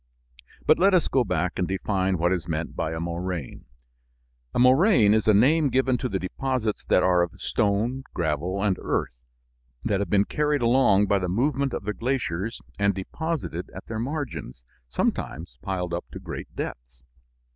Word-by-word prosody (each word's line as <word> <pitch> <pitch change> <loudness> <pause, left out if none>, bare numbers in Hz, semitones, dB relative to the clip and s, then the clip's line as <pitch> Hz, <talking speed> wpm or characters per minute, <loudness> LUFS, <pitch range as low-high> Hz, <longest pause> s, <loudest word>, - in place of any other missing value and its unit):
But - - +5
let 195 +1 +5
us 175 - +3
go 130 - +2
back 90 -4 -1
and 90 - +1
define 95 -1 0
what 85 +2 +1
is 90 -2 -1
meant 80 -1 -3
by 80 - -2
a 80 - -4
moraine. 85 -3 -4 0.9
A - - -4
moraine 125 - +5
is 110 -1 +1
a - - +7
name 145 +7 +4
given 130 0 +2
to 130 - -2
the 95 - -1
deposits 110 +4 -2
that - - +3
are 90 -1 +4
of 85 -1 -3
stone, 110 +6 0
gravel, 85 +4 -1
and 95 -3 +2
earth - - -2 0.6
that 100 -2 +1
have 100 -3 -2
been 100 +1 +3
carried 150 -3 0
along 115 -4 +4
by 100 -1 +2
the 90 -1 -2
movement 135 +7 +1
of - - -4
the 105 +1 -2
glaciers 115 -5 -2 0.2
and 100 -1 +2
deposited 115 - -4
at 95 - -8
their 110 -1 -4
margins, 125 - -4 0.3
sometimes 75 +6 -2
piled 90 -3 -3
up 85 - -3
to - - -6
great - - -7
depths. - - -7
100 Hz, 175 wpm, -25 LUFS, 90-130 Hz, 0.9 s, a